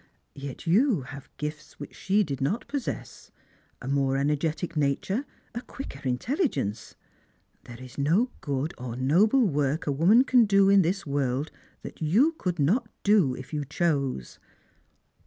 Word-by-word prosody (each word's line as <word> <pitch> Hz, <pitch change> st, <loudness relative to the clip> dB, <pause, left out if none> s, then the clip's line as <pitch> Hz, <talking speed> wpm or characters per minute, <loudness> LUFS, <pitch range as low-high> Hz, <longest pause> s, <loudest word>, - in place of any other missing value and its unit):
Yet 140 Hz, -2 st, -8 dB
you 205 Hz, -, +3 dB
have 140 Hz, +1 st, -10 dB
gifts 150 Hz, 0 st, -6 dB
which 145 Hz, -, -8 dB
she 205 Hz, +2 st, +1 dB
did 140 Hz, -6 st, -5 dB
not 170 Hz, -, -1 dB
possess 280 Hz, -3 st, -5 dB, 0.3 s
— -, -, -37 dB
a -, -, -6 dB
more 135 Hz, -1 st, +1 dB
energetic 150 Hz, +4 st, -1 dB
"nature, 155 Hz, -, 0 dB, 0.3 s
a 240 Hz, -, -4 dB
quicker 250 Hz, -, -9 dB
intelligence. 125 Hz, -, -2 dB, 0.7 s
There 120 Hz, 0 st, -11 dB
is 130 Hz, +1 st, -10 dB
no 180 Hz, -, +2 dB
good 140 Hz, +1 st, -2 dB
or 125 Hz, -2 st, -5 dB
noble 190 Hz, -, +3 dB
work 145 Hz, -1 st, 0 dB
a 145 Hz, -, 0 dB
woman 180 Hz, -, +5 dB
can 250 Hz, -3 st, +4 dB
do 195 Hz, -1 st, +4 dB
in 200 Hz, 0 st, +6 dB
this 190 Hz, +3 st, -1 dB
woi 140 Hz, -3 st, -1 dB
ld 155 Hz, -, -8 dB, 0.3 s
that -, -, -10 dB
you 210 Hz, -, +3 dB
could 180 Hz, -3 st, -2 dB
not 210 Hz, -, +1 dB
do, 195 Hz, -11 st, +3 dB
if 130 Hz, +4 st, -10 dB
you 150 Hz, -1 st, -1 dB
chose." 140 Hz, -, -2 dB
155 Hz, 155 wpm, -27 LUFS, 140-200 Hz, 0.7 s, in